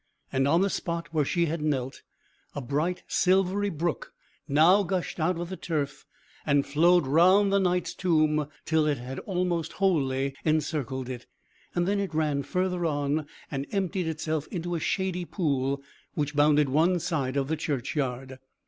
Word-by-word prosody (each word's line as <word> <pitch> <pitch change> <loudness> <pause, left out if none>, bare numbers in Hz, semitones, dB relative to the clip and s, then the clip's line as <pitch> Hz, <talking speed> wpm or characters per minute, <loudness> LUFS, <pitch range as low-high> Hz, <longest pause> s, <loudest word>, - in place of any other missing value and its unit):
and 135 +1 +2
on 165 +5 +4
the 200 - +2
spot 170 -3 -3
where 155 -2 +2
she 170 +4 +1
had 165 0 -2
knelt, 135 -4 -2 0.5
a - - -2
bright 150 +8 -1
silvery 190 +2 +2
brook 165 - -3 0.3
now 165 +8 +5
gushed 185 -2 -2
out 165 +2 +1
of 175 0 -4
the 190 - -4
turf, 150 -6 -3 0.4
and 140 -2 +2
flowed 170 +3 +4
round 185 +8 +5
the 200 - +4
Knight's 180 -1 0
tomb, 155 -4 +2 0.2
till 155 -1 +2
it 145 -2 +1
had 125 +2 -6
almost 175 -4 -2
wholly 140 -8 +1
encircled 150 -4 -1
it; 125 -2 -7 0.5
then 185 +4 +1
it 195 -5 -3
ran 150 -3 +1
further 180 +4 -1
on, 145 -1 0 0.2
and 135 0 -3
emptied 190 -3 -1
itself 160 -1 -2
into 175 -2 -4
a 170 - -1
shady 185 +2 -1
pool 140 -6 -1 0.3
which 145 -1 -2
bounded 150 0 +4
one 160 +7 +3
side 145 -6 -2
of 135 -1 0
the 160 - 0
churchyard. 135 -3 -3
155 Hz, 160 wpm, -27 LUFS, 140-180 Hz, 0.5 s, now